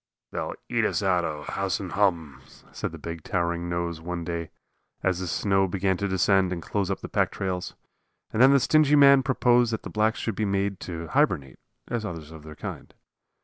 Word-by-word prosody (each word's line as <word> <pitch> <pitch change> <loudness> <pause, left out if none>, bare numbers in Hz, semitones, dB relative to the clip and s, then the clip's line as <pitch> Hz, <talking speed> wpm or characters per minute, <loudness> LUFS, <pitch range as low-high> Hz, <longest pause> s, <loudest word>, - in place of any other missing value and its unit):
"They'll - - -4
eat - - 0
us 100 - 0
out 90 -2 +2
o' 75 -2 -4
house 95 +5 -2
and 95 -3 -6
hum," 80 -10 0 0.3
said - - -4
the - - -8
big, 85 -1 -7
towering 85 0 -1
nose 85 -1 -3
one 85 0 -4
day, 85 -1 -4 0.5
as 95 -1 +1
the 95 - -3
snow 95 +4 +1
began 95 +1 0
to 100 - -1
descend 95 0 +2
and 90 - -2
close 100 +3 -2
up 95 - -2
the - - -6
pack - - +1
trails. 90 -2 -4 0.6
And 110 - +1
then 130 - +8
the 140 - +6
stingy 150 +2 +4
man 140 -1 +7
proposed 125 -2 +3
that 110 - -3
the - - -7
blacks 110 +1 +1
should 115 - -2
be 110 - -1
made 100 -1 0
to 85 -2 -5
hibernate, 70 -4 +1 0.3
as 120 -2 -2
others 80 -6 -6
of 80 -1 -10
their 75 0 -11
kind. - - -8
95 Hz, 205 wpm, -26 LUFS, 85-105 Hz, 0.6 s, then